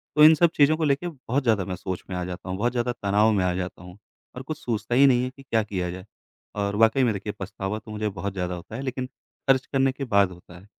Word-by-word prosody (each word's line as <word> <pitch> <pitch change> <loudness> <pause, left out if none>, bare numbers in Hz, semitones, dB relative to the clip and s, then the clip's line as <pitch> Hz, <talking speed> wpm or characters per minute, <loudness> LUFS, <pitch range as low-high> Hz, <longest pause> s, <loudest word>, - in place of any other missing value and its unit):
तो 150 - +6
इन 160 +1 +9
सब 170 +1 +4
चीज़ों 150 +2 +5
को 160 - -2
लेके 145 +3 +1
बहुत 140 -4 -3
ज़्यादा 110 -6 +2
मैं 90 - -4
सोच 95 0 -5
में 95 - -4
आ 90 - -2
जाता 90 0 -7
हूँ। 95 - -2
बहुत 120 +4 +1
ज़्यादा 120 0 -1
तनाव 105 0 +2
में 100 -3 +2
आ 90 - +1
जाता 90 -1 -5
हूँ 90 +2 -12 0.4
और 125 - -6
कुछ 155 +2 -5
सूझता 115 0 -2
ही 140 +2 +7
नहीं 125 -2 +4
है 130 - -2
कि 135 - -14
क्या 115 -4 +1
किया 95 -4 -3
जाए। 90 +2 -8 0.5
और 100 0 -1
वाक़ई 115 +5 +4
में 120 -3 +2
देखिए 100 +1 -5
पछतावा 95 +2 -4
तो 110 0 -12
मुझे 105 0 -2
बहुत 100 0 -5
ज़्यादा 90 -2 -3
होता 90 +5 -9
है 130 - -4
लेक़िन 130 -1 -3 0.4
ख़र्च 130 -1 +4
करने 135 -1 +1
के 135 - -6
बाद 100 -5 +3
होता 90 0 -14
है। 95 - -18
110 Hz, 275 wpm, -25 LUFS, 95-130 Hz, 0.5 s, इन